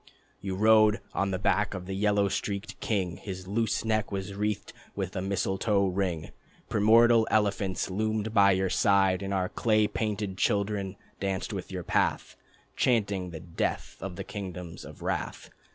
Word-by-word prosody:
You 95 -1 -3
rode 110 +1 +5
on 100 - 0
the 95 - -1
back 105 +1 +1
of 90 -1 -6
the 95 - -5
yellow 100 0 +2
streaked 100 +1 -3
king, 100 -9 -1
His 95 -2 -7
loose 105 +1 0
neck 110 -1 0
was 100 0 -4
wreathed 105 +1 -2 0.2
with - - -3
a 90 - -1
mistletoe 100 +1 +1
ring. 90 -4 -2 0.4
Primordial 115 +1 +5
elephants 100 -3 +1
loomed 110 +2 -1
by 100 -2 +6
your 95 0 0
side, 95 -2 +3
And 100 0 -4
our 95 -2 +1
clay 110 +2 +2
painted 105 -4 -3
children 100 -1 0 0.2
danced 95 -1 -2
by - - -2
your - - -5
path, - - 0 0.4
Chanting 100 -7 +1
the 80 -3 -8
death 85 0 -3
of 95 -2 -5
the - - -5
kingdoms 90 -4 -7
of - - -11
wrath. - - -3
100 Hz, 160 wpm, -28 LUFS, 95-105 Hz, 0.4 s, by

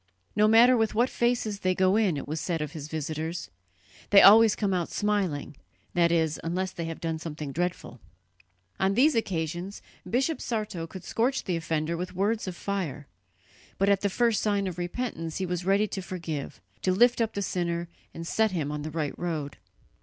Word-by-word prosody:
"No 210 +1 +4
matter 235 +3 +7
with 225 -2 +1
what 240 +4 +2
faces 235 -4 0
they 185 -1 +1
go 185 +1 +3
in," 205 -8 +2
it - - -6
was 155 +2 -3
said 170 -3 -1
of 150 -1 -4
his 155 -3 -7
visitors, 160 +2 -4 0.6
"they 200 - +8
always 220 +2 +8
come 200 -3 0
out 175 -2 -1
smiling 190 -9 -1 0.4
that 170 -2 +3
is, 160 -2 +1
unless 180 +3 -2
they 170 -2 -5
have 165 0 -5
done 160 -1 -3
something 155 -3 -6
dreadful." 175 +4 -3 0.8
On 190 +1 +2
these 290 +6 +5
occasions 175 - -3 0.3
Bishop 270 +7 0
Sarto 210 -8 -3
could 185 +2 -10
scorch 250 +4 0
the 180 - -1
offender 160 0 -1
with 180 +2 -5
words 205 +3 0
of 185 - -4
fire, 175 -8 -3 0.7
but 195 +1 +2
at 200 -1 +3
the 200 - +1
first 230 +2 +1
sign 205 -2 +1
of 180 -2 -4
repentance 175 -3 -4
he 190 - -1
was 180 0 -3
ready 200 +2 +3
to 190 - -4
forgive, 165 - -5 0.2
to 185 - +1
lift 240 +4 +4
up 225 -1 0
the 200 - -1
sinner 170 -2 -2 0.2
and 165 - -7
set 220 +5 +2
him 160 -7 -2
on 150 0 -4
the 155 - -4
right 155 -2 -2
road. 155 -5 -3
185 Hz, 190 wpm, -27 LUFS, 165-210 Hz, 0.8 s, they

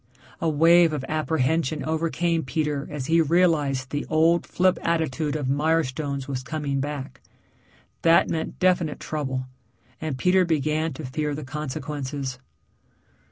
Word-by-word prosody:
A 165 - +2
wave 165 +2 +5
of 140 -3 -3
apprehension 155 0 0
overcame 165 +1 0
Peter 145 +1 -2
as 145 -3 -5
he 165 +3 +4
realized 150 -5 +2
the 145 0 -3
old 165 +2 +3
flip 185 0 +2
attitude 160 -3 -1
of 145 -4 -2
Mirestone's 140 -1 0
was 135 -2 -3
coming 140 0 -3
back. 140 -1 -5 0.8
That 165 0 +5
meant 160 -1 -3
definite 180 -4 +1
trouble, 135 -4 -3 0.6
and 155 -4 -3
Peter 185 +6 +4
began 155 -1 0
to 145 +2 -7
fear 150 +3 -2
the 150 - -6
consequences. 140 -2 -4
155 Hz, 130 wpm, -25 LUFS, 140-165 Hz, 0.8 s, wave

